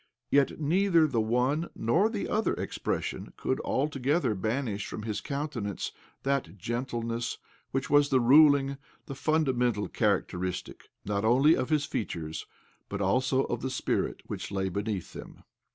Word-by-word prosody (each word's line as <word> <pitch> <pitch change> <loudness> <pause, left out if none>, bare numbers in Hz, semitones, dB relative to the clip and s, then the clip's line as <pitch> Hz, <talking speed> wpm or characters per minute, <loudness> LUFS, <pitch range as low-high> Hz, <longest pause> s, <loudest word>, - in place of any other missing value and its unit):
Yet 140 +2 +3
neither 170 +2 +3
the 125 -7 +1
one 125 +9 +1
nor 170 - +2
the 215 -3 -3
other 215 +1 +1
expression - - -3
could - - -1
altogether 140 -1 0
banish 110 +1 -2
from 105 - -6
his 110 -2 -3
countenance 140 -9 -3 0.3
that 135 -10 -1
gentleness 120 +2 -3 0.3
which 135 -1 -2
was 145 +1 +4
the 130 - +4
ruling, 140 +1 +5 0.3
the - - -6
fundamental, 130 -7 +1
charac 105 -4 +1
teristic, 90 0 -5 0.2
not 100 0 -1
only 135 +8 +5
of 130 - -2
his 150 -2 +2
features, 80 - -4 0.4
but 100 - -4
also 130 +7 +2
of - - -3
the 130 - -2
spirit 130 - -1
which - - -5
lay 95 -1 -1
beneath 100 0 -3
them. - - -10
130 Hz, 145 wpm, -29 LUFS, 105-145 Hz, 0.4 s, ruling